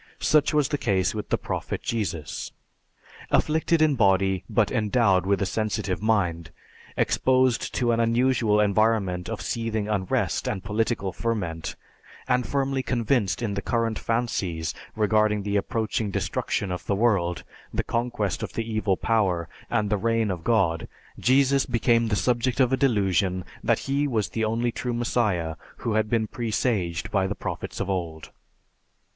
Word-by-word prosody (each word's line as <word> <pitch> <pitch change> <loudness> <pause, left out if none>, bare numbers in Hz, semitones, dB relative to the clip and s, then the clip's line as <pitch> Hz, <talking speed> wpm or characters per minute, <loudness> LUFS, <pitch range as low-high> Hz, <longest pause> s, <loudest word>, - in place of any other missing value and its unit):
Such 150 -2 +3
was 150 -3 +2
the 145 - -1
case 95 -4 +1
with 105 -1 -5
the - - +2
Prophet - - -4
Jesus. 85 - -3 0.8
Afflicted 160 +1 +2
in 155 -2 +4
body 95 -4 +2
but 110 -1 +2
endowed 105 -5 +2
with 100 -1 +2
a - - 0
sensitive 100 -2 -2
mind, 90 -7 0 0.5
exposed 130 -2 +2
to 120 -2 +2
an 115 - +1
unusual 115 -2 +2
environment 105 -3 +1
of 115 - -4
seething 110 -2 -2
unrest 100 -4 0
and 95 - -2
political 105 -2 -1
ferment, 90 -9 -3 0.5
and 125 -1 +1
firmly 135 -1 0
convinced 120 -4 0
in 105 -3 -1
the 100 - -2
current 115 0 -1
fancies 95 -9 -1 0.2
regarding 105 -1 +2
the 100 0 -2
approaching 110 0 -1
destruction 95 0 -2
of 90 - -4
the 100 - +1
world, 95 -6 +1 0.3
the - - -1
conquest 115 -5 -2
of - - -5
the 115 0 -3
Evil 105 -3 +1
Power, 95 -7 +1 0.2
and 105 -1 0
the 105 - +3
Reign 115 -2 +1
of 85 -3 -5
God, 95 -8 +1 0.3
Jesus 135 +2 +3
became 115 0 +2
the 105 - +1
subject 125 +4 0
of 130 -1 +3
a - - +6
delusion 100 - +1 0.2
that - - +3
he 140 +2 +1
was 110 -6 0
the 110 -1 -1
only 115 +2 0
true 120 +1 -3
Messiah 105 -9 0 0.2
who 115 - -2
had 110 0 +1
been 115 -1 +1
presaged 110 -7 -1
by 95 -2 +2
the 100 - -3
prophets - - -5
of 100 - -2
old. 85 -5 -4
110 Hz, 155 wpm, -25 LUFS, 95-120 Hz, 0.8 s, a